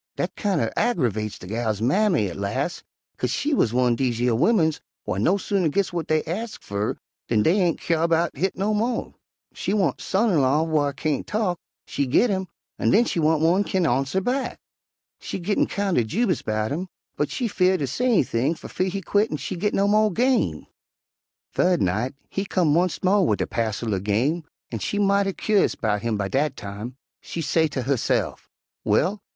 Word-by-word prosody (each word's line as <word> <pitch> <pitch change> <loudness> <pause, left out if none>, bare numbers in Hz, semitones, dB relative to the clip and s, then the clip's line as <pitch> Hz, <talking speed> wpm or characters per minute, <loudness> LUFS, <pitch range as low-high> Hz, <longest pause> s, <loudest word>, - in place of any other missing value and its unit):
Dat - - -2
kind 200 -5 0
er 115 - -1
aggervex 115 - 0
de - - -11
gal's 110 +1 -2
mammy 155 - +2
at 90 - -6
las', 130 - -2 0.4
'kase - - 0
she 300 +1 0
wuz 255 - +3
one'r 125 -1 +2
dese 120 -2 0
yer 120 0 +2
wimmins 160 - +2 0.2
whar 95 - -2
no 180 - +3
sooner 195 -3 0
gits 195 +5 0
w'at 170 -2 -4
dey 155 0 +2
ax 215 +8 -4
fer 100 +1 -3 0.3
dan 110 -3 +2
dey 180 +6 +3
ain' 175 -2 +2
kyare 165 0 0
'bout 165 0 +1
hit 190 +1 -1
no 200 +3 0
mo.' 230 +3 -1 0.4
She 200 - -2
want 195 -5 +1
son 215 +3 +1
in 160 -6 +3
law 140 +4 +3
whar 155 -3 +1
kain't 140 +2 -2
talk, 205 -5 -1 0.3
she 140 - -2
git 205 - +3
him, 190 -1 -1 0.3
an' - - +2
den 230 +4 +5
she 175 - -1
want 160 0 +2
one 175 +4 +4
whar - - +1
kin 190 -3 0
arnser 135 +5 +1
back. 260 +4 -1 0.6
She - - -5
gittin' 195 +3 0
kind 200 -7 0
er - - +2
jubous 185 - 0
'bout 110 0 -1
him, 175 +6 -3 0.3
but 150 - -1
she 245 - -2
'feared 185 -3 +2
ter - - +1
say 145 - -2
anything 150 - +2
fer - - -10
fear 185 - -1
he 195 +1 -4
quit 205 +4 +2
an' 150 - -3
she 185 - -5
git 210 +4 -1
no 200 +1 +2
mo' 215 +1 +4
game. 215 - +1 0.9
"Thu'd 180 -2 +2
night 110 +9 0
he 195 - -3
come 170 -6 +2
onct 180 0 0
mo' 195 +2 +4
wid 185 - +1
a - - +1
passel 110 -1 -2
er 95 - 0
game, 125 - 0 0.3
an' - - -3
she 205 - -2
mighty 200 -1 +2
cur'ous 210 0 +1
'bout 105 -2 0
him 115 -1 -1
by 100 -1 -1
dat 135 +5 0
time. 105 +5 -7 0.3
She - - -6
say 160 +2 +2
ter 135 -4 -4
husse'f, 135 -1 -1 0.3
'Well! 200 +2 +1
165 Hz, 205 wpm, -24 LUFS, 125-195 Hz, 0.9 s, den